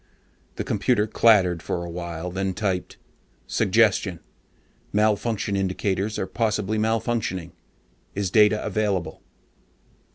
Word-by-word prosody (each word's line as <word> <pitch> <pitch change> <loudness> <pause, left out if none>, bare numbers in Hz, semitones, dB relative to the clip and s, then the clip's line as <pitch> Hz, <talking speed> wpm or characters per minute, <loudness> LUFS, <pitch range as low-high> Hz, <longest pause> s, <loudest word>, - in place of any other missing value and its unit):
The - - -3
computer 105 +1 +1
clattered 95 -7 +4
for 85 0 -3
awhile, 85 0 -5
then 95 0 -2
typed: 95 -3 -2 0.5
SUGGESTION: - - +2 0.7
MALFUNCTION 105 0 +1
INDICATORS 95 +2 -1
ARE - - -1
POSSIBLY 110 -1 -1
MALFUNCTIONING. 110 -5 -1 0.6
IS 100 -2 -1
DATA 105 0 +4
AVAILABLE? 100 -7 -1
100 Hz, 95 wpm, -24 LUFS, 90-110 Hz, 0.7 s, clattered